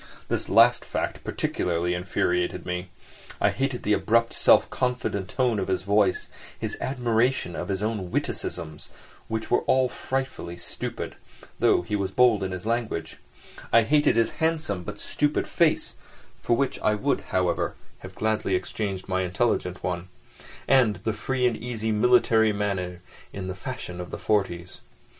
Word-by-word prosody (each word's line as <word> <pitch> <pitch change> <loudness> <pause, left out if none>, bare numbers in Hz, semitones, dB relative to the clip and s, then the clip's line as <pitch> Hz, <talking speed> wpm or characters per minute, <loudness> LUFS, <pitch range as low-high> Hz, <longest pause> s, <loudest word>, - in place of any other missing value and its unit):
This - - -1
last - - +6
fact - - -3
particularly 85 0 -1
infuriated 90 0 -1
me. 90 0 -3 0.5
I - - +3
hated 135 -1 -2
the 105 - +2
abrupt 115 +2 +2
self - - +5
confident 125 -6 -1
tone 125 -4 +1
of 95 - -2
his 95 -1 -1
voice, 100 -1 +2 0.3
his - - -4
admiration 120 -6 0
of 90 - -4
his 100 +1 -1
own 105 -4 -2
witticisms, 80 -3 -3 0.4
which 110 0 -4
were 120 - +3
often 130 -1 +3
frightfully 130 -10 -3
stupid, 85 - -6 0.4
though - - +4
he 95 +4 -2
was 100 -2 -1
bold 115 +1 +4
in 95 -1 -2
his 90 +1 -6
language; 115 0 -2 0.5
I 115 - +6
hated 150 +3 +3
his 115 -1 +2
handsome, 160 - 0
but 105 +3 -7
stupid 150 0 0
face - - +2 0.5
(for 120 - +1
which 140 -2 0
I 105 - +2
would, 135 +7 0
however, 90 -2 0 0.2
have - - -11
gladly 110 -3 0
exchanged 95 0 -3
my 95 -1 0
intelligent 95 -1 0
one), 90 0 -2 0.6
and 125 -6 +5
the 110 +5 -2
free 125 +4 -1
and 120 -2 +2
easy 110 -1 -3
military 110 0 +4
manners 95 -4 -2 0.3
in 95 -1 -4
fashion 90 -4 -6
in 90 - -7
the - - -5
"'forties." 90 -4 -1
105 Hz, 150 wpm, -26 LUFS, 90-120 Hz, 0.6 s, last